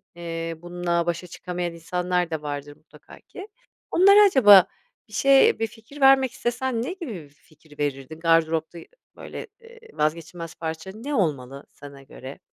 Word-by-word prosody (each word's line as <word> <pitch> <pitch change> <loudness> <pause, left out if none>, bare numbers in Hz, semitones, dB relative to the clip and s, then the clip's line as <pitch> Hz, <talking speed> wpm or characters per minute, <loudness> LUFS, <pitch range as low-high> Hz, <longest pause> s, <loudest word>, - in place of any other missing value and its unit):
eee, 165 -1 -5
bununla 175 -1 -2
başa 175 +1 -3
çıkamayan 175 0 -5
insanlar 180 +1 -2
da 160 -2 -4
vardır 145 -1 -6
mutlaka 155 +1 -18
ki. 385 +2 -12 0.4
Onlara 400 +3 +6
acaba 205 - +7 0.4
bir 215 - -19
şey 270 +5 +4
bir 225 - 0
fikir 230 +7 -15
vermek 270 -1 +5
istesen 240 0 -2
ne 360 - -4
gibi 335 - -7
bir 155 -7 -10
fikir 150 0 -23
verirdin? 145 +1 -4
Gardıropta 165 0 +1 0.4
böyle, - - -9 0.2
ııı, 460 0 -16 0.2
vazgeçilmez 165 +2 -3
parça 160 +3 -6
ne 275 +7 -5
olmalı 140 - -2
sana 140 -1 -13
göre? 135 0 -11
170 Hz, 150 wpm, -24 LUFS, 155-230 Hz, 0.4 s, acaba